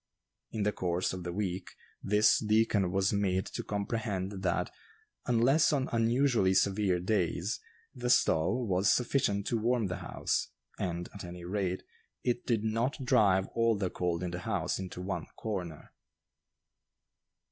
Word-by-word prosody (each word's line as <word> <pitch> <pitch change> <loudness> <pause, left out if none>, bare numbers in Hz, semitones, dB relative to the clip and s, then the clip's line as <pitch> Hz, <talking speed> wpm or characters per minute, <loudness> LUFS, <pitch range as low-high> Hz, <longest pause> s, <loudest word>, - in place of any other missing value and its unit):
In 110 - -2
the 105 - +2
course 90 -2 -1
of 95 - -5
the 90 0 -4
week, 95 -1 -3 0.3
this 105 +2 +4
deacon 105 -3 +2
was 95 +1 +1
made 95 -2 +1
to - - -5
comprehend 100 -2 -3
that, 90 -2 0 0.6
unless 130 +8 +4
on 135 -3 0
unusually 115 -4 +2
severe 95 -1 +2
days, 90 +1 0 0.3
the 125 -2 -3
stove 115 +3 +3
was 95 +1 +3
sufficient 120 -5 +1
to 115 - 0
warm 120 0 +1
the 90 -1 -3
house, 90 - -1 0.3
and, 85 -1 -2
at 100 - -8
any 90 0 -8
rate, 95 0 -2 0.4
it 120 -1 -1
did 115 -3 +1
not 120 +5 -1
drive 100 -7 +4
all 115 -2 +2
the 95 -2 -1
cold 90 -1 -1
in 90 - -2
the 90 - -4
house 100 -1 -1
into 90 -1 -6
one 95 +1 -3
corner. 90 -8 -5
100 Hz, 145 wpm, -31 LUFS, 90-115 Hz, 0.6 s, this